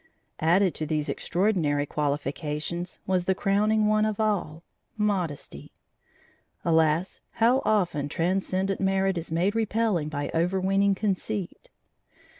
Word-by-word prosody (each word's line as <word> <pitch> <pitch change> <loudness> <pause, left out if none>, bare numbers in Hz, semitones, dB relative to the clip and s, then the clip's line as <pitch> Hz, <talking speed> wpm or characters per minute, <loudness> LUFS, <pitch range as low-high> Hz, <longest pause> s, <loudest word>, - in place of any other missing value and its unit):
Added 180 +3 +3
to 155 - -4
these 155 -1 -1
extraordinary 170 -7 0
qualifications, 150 +4 -3
was 185 -2 0
the 190 - +2
crowning 210 +2 +2
one 215 0 +3
of 215 -1 -1
all 180 -7 -1 0.3
modesty. 190 -8 -2 0.9
Alas, 160 +2 +2
how 240 +4 +3
often 175 -9 +1
transcendent 190 +3 -1
merit 195 0 +1
is 170 -1 -5
made 175 +5 +1
repelling 220 -7 0
by 145 -1 -3
overweening 190 +3 +2
conceit. 205 - -3
185 Hz, 110 wpm, -26 LUFS, 160-205 Hz, 0.9 s, Added